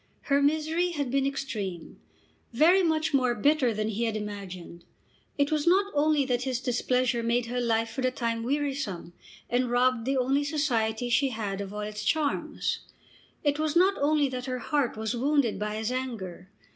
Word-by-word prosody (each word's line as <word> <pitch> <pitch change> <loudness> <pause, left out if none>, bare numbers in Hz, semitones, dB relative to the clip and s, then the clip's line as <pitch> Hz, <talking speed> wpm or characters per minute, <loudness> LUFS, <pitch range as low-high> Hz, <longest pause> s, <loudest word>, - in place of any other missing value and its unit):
Her 280 - +4
misery 315 +4 +1
had 285 -5 -2
been 275 0 +2
extreme; 210 -11 -5 0.5
very 335 +10 +5
much 315 -3 +1
more 255 -3 +2
bitter 275 +1 +3
than 215 0 -2
he 225 +2 -1
had 220 -1 -1
imagined. 190 -5 -7 0.5
It 285 +1 +1
was 305 +1 0
not 395 +3 +3
only 295 -1 +3
that 245 -2 0
his 255 -1 -1
displeasure 250 -1 0
made 235 +1 +1
her 245 +1 -2
life 225 -1 0
for 245 - -4
the 255 - +2
time 230 -2 -2
wearisome, 270 - -2 0.3
and 245 +1 0
robbed 245 -1 +2
the 270 +1 +1
only 270 +3 +2
society 245 -6 0
she 275 +3 +3
had 205 -4 -3
of 195 -1 -6
all 210 0 -5
its 210 0 -5
charms. 300 -3 0 0.6
It 290 0 +1
was 310 0 0
not 375 +3 +5
only 295 0 +3
that 250 -1 -5
her 255 -1 -2
heart 270 -2 -1
was 220 +2 -2
wounded 270 -3 +1
by 210 0 -2
his 220 +2 -2
anger. 210 -9 -5
255 Hz, 180 wpm, -28 LUFS, 225-290 Hz, 0.6 s, very